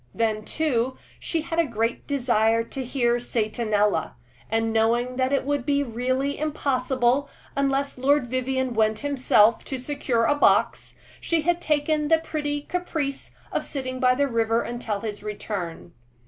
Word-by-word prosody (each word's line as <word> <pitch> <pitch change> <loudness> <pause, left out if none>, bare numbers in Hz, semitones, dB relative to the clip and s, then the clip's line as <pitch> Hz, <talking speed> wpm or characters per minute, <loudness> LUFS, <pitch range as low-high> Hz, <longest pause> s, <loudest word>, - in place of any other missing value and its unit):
Then, 215 -2 0
too, 260 -5 0 0.2
she 330 - -2
had 325 +1 -3
a 335 - +3
great 230 -1 -2
desire 230 -5 +2
to 260 +3 -6
hear 240 -1 +1
"Satanella," 215 -5 0 0.4
and 225 0 0
knowing 235 +3 +2
that 260 0 +1
it 275 -1 +1
would 285 -2 0
be 285 +1 +1
really 255 +3 -1
impossible, 275 -3 0 0.3
unless 275 -1 0
Lord 280 0 +3
Vivianne 255 0 -1
went 220 -1 +1
himself, 250 -5 +4
to 265 - -4
secure 255 -3 -1
a 290 - +4
box, 290 - +2 0.2
she 335 -1 0
had 345 +2 +1
taken 300 -1 +1
the 325 +1 +5
pretty 295 -2 -3
caprice 315 -5 -3 0.2
of - - -1
sitting 260 -2 -4
by 255 0 +4
the 285 +2 +2
river 230 -1 +1
until 230 -4 -4
his 210 -2 -5
return. 200 -5 -5
255 Hz, 150 wpm, -25 LUFS, 230-285 Hz, 0.4 s, the